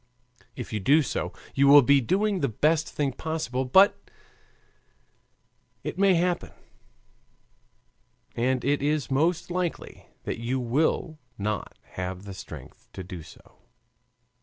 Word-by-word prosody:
If 125 -3 -7
you 105 - -1
do 145 +11 +4
so, - - -3 0.2
you 140 +1 +3
will 145 0 +9
be 140 +2 +5
doing 195 - +1
the 140 - +1
best 155 +8 +1
thing 145 -2 -1
possible. 135 -4 -3
But 190 - +4 1.7
it - - -5
may 195 -2 +5
happen, 175 +1 0 1.8
and 125 +1 0
it 145 +1 +1
is 145 -1 -1
most 165 +6 +1
likely, 180 -1 -4 0.2
that - - -4
you 125 +3 -1
will 150 +5 0 0.2
not 105 0 -3
have 90 +1 -5
the 100 -1 -8
strength - - -11
to 95 - -7
do 90 -1 -8
so. 75 - -17
140 Hz, 130 wpm, -26 LUFS, 120-165 Hz, 1.8 s, will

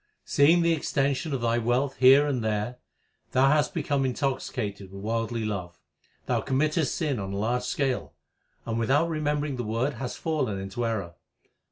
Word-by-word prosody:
Seeing 165 +5 +4
the 170 0 +3
extension 140 0 0
of 135 -3 -2
thy 115 0 +1
wealth 125 +4 0
here 135 +3 +7
and 130 -5 -1
there, 110 +3 -1 0.6
thou 135 +1 +5
hast 150 -1 +2
become 145 -3 0
intoxicated 125 -7 -2
with 100 0 -9
worldly 115 +1 -1
love. 90 -5 -4 0.5
Thou - - 0
commit 140 +3 +1
test 155 -5 0
sin 145 -8 -1
on 95 0 -4
a - - -3
large 120 +4 0
scale, 125 - -1 0.5
and 115 0 -2
without 145 +8 +2
remembering 150 -3 -1
the 120 - -2
Word 115 +6 -1
hast 125 +1 -5
fallen 150 -11 -1
into 95 +5 -3
error. 100 -7 -3
125 Hz, 170 wpm, -27 LUFS, 110-145 Hz, 0.6 s, here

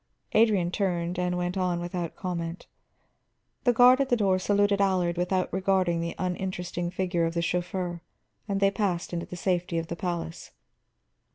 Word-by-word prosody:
Adrian 210 -6 +3
turned 180 -3 -1
and 180 0 0
went 180 +1 -2
on 180 -2 0
without 175 -1 -4
comment. 175 -2 -4 1.0
The 245 - +6
guard 250 +3 +6
at 270 - 0
the 245 - +3
door 190 -3 +2
saluted 205 +1 +2
Allard 185 -3 +2
without 180 +1 0
regarding 185 -3 +1
the 170 0 -3
uninteresting 180 -1 -3
figure 180 -2 0
of 165 - -5
the 170 - 0
chauffeur, 175 0 -2 0.5
and 200 -1 -1
they 195 0 +4
passed 190 -4 -1
into 170 -1 -3
the - - -7
safety 180 -2 0
of 165 0 -3
the 170 - -3
palace. 170 -2 -4
180 Hz, 165 wpm, -27 LUFS, 175-195 Hz, 1.0 s, The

